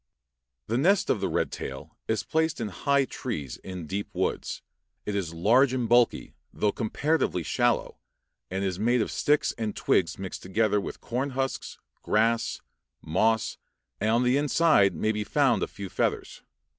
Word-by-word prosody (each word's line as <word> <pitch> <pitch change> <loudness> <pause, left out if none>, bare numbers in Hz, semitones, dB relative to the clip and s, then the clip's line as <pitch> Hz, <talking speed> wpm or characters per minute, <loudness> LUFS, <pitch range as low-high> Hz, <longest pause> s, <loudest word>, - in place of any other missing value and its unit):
The 115 +3 0
nest 190 +7 +3
of 105 - 0
the 95 - 0
red - - 0
tail 65 0 -7
is 110 -2 0
placed 160 0 0
in 110 -3 -2
high 140 +7 +1
trees 75 - -5
in 95 -3 -7
deep 100 +6 -4
woods; - - -2 0.4
it 105 - -2
is 95 -5 -2
large 120 +11 +3
and 125 -3 0
bulky, 120 +1 +3 0.2
though 105 - +1
comparatively 120 - 0
shallow, 120 - 0 0.5
and 95 +1 -2
is 95 -2 -2
made 120 +2 +2
of - - -5
sticks 150 0 +2
and 110 -2 -2
twigs 85 -3 +1
mixed 95 -1 -6
together 105 +2 +1
with - - -7
corn 130 +4 -2
husks, 135 0 -2 0.2
grass, 115 +2 +1 0.4
moss, 110 +7 +1 0.4
and 110 - +1
on 115 +2 +3
the 125 +2 +3
inside 145 - +4
may 110 +7 +1
be 105 -1 -2
found 125 -4 +2
a - - 0
few 100 -1 -7
feathers. - - -2
110 Hz, 165 wpm, -27 LUFS, 95-130 Hz, 0.5 s, inside